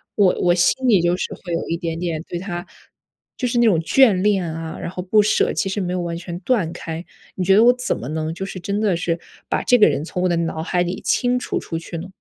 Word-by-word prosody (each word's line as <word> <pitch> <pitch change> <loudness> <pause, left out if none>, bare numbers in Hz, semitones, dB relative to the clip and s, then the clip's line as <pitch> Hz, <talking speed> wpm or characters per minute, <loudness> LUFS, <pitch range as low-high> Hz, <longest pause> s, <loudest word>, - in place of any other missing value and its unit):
我 195 -3 +4
我 175 - +4
心 255 +8 +2
里 200 -7 +5
就 175 +1 +1
是 - - -3
会 175 -3 -7
有 165 - -2
一 165 - 0
点 165 -2 -4
点 165 -2 -2
对 175 - -4
他 175 -1 -5 0.7
就 250 - -2
是 240 - -1
那 240 - +4
种 195 -8 +4
眷 235 +8 +5
恋 200 -2 +2
啊， 165 0 -6
然 - - -5
后 180 - -5
不 200 +4 +3
舍， 215 - +2
其 - - -1
实 195 +1 -2
没 180 - -2
有 185 - -1
完 170 -1 -3
全 175 0 -6
断 210 -11 +1
开， 165 0 -6 0.3
你 185 - -2
觉 190 +2 +4
得 215 - +6
我 245 +1 +7
怎 250 0 -2
么 115 - -6
能 155 +1 -2
就 190 +3 -5
是 195 -1 -7
真 200 +3 -2
的 210 -4 +2
是 170 0 -1 0.3
把 - - 0
这 250 - +5
个 210 - +7
人 145 - -1
从 180 - -4
我 185 - +2
的 175 - +2
脑 165 -1 -2
海 175 +2 0
里 180 +1 -4
清 250 0 +1
除 - - -3
出 165 - -5
去 170 0 -7
呢？ 170 +3 -6
180 Hz, 290 characters per minute, -21 LUFS, 170-205 Hz, 0.7 s, 我